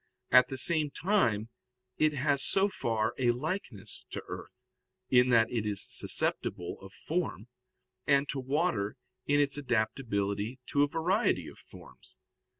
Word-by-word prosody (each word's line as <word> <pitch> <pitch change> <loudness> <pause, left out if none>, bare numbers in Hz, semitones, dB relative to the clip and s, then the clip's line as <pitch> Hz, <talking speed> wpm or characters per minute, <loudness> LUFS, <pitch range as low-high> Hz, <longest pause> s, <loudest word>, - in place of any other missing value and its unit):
At 125 0 +7
the 130 - -5
same 155 +1 +3
time 120 - 0 0.5
it 155 0 +3
has 140 0 +1
so 195 +1 +2
far 115 - -1
a 125 -2 +2
likeness 130 - -4
to - - -6
earth, - - -9 0.5
in 125 0 +5
that 115 -2 +4
it 115 -3 -1
is 105 -2 +1
susceptible 90 0 0
of 95 - -11
form, 155 - -4 0.6
and 140 -1 +3
to 140 - -2
water 135 - -1 0.3
in 145 0 +3
its 145 0 +2
adaptability 110 -3 -1
to 145 - +2
a 145 - +4
variety 175 +9 0
of - - -12
forms. - - -14
130 Hz, 145 wpm, -30 LUFS, 110-150 Hz, 0.6 s, At